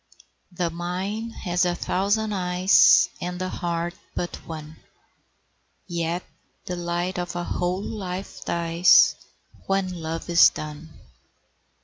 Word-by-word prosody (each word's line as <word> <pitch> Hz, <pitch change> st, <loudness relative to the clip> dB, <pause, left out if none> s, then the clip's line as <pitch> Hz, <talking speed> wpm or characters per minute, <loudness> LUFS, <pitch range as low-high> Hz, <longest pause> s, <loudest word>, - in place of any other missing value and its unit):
The 175 Hz, -1 st, -2 dB
mind 190 Hz, +7 st, -4 dB
has 180 Hz, 0 st, +1 dB
a 175 Hz, -1 st, +1 dB
thousand 210 Hz, +5 st, 0 dB
eyes, 180 Hz, 0 st, +5 dB
And 180 Hz, 0 st, -4 dB
the 185 Hz, 0 st, -2 dB
heart 170 Hz, -1 st, -3 dB, 0.2 s
but 175 Hz, -, -3 dB
one; 155 Hz, -1 st, -8 dB, 1.1 s
Yet 170 Hz, 0 st, -2 dB, 0.4 s
the 180 Hz, -, -3 dB
light 175 Hz, +1 st, -2 dB
of 175 Hz, 0 st, -4 dB
a 175 Hz, -, -2 dB
whole 180 Hz, +2 st, -2 dB
life 190 Hz, -3 st, -6 dB
dies 170 Hz, +1 st, +4 dB, 0.5 s
When 185 Hz, -3 st, -1 dB
love 160 Hz, +1 st, -4 dB
is 170 Hz, -1 st, +7 dB
done. 155 Hz, +1 st, -8 dB
175 Hz, 115 wpm, -24 LUFS, 170-185 Hz, 1.1 s, is